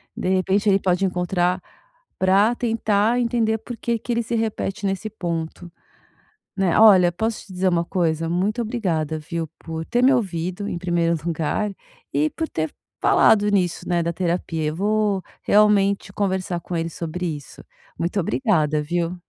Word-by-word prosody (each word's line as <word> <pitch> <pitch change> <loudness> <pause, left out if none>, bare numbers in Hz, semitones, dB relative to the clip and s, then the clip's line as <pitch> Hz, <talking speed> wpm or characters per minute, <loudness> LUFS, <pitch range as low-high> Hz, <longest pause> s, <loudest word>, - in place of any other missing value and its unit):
De 180 - -2
repente, 190 +2 +2
ele 195 0 +4
pode 185 0 +1
encontrar 180 0 0 0.6
pra 200 +5 +3
tentar 225 0 +1
entender 225 -2 +1
porque 235 0 -3
que 240 - -3
ele 235 0 +1
se 235 - -3
repete 215 -2 -2
nesse 195 +2 -1
ponto, 170 -3 -5 0.9
né? 190 -3 +2
Olha 190 -5 +7
posso 220 +5 -3
te 190 - -12
dizer 185 +1 0
uma 170 -1 +1
coisa? 165 -3 0
Muito 195 +8 0
obrigada 165 -9 -2
viu, 165 +1 -4
por 160 0 -6
ter 245 +1 +1
me 265 - +6
ouvido 185 -4 -1
em 175 - -3
primeiro 170 -1 +1
lugar, 170 +5 -1 0.4
e 150 +2 +1
por 320 - -4
ter 155 -1 -2 0.3
falado 205 -1 +4
nisso, 185 -4 0
né, 175 -1 +1
da 170 0 -1
terapia 170 -2 -2
eu 150 0 -1
vou 205 0 +1 0.2
realmente 200 -1 +3
conversar 190 -3 -1
com 175 +1 -6
ele 165 0 -1
sobre 170 +2 -5
isso. 145 - -13 0.3
Muito 175 +4 -1
obrigada 165 - +1
viu? 170 +3 -2
185 Hz, 160 wpm, -22 LUFS, 170-210 Hz, 0.9 s, Olha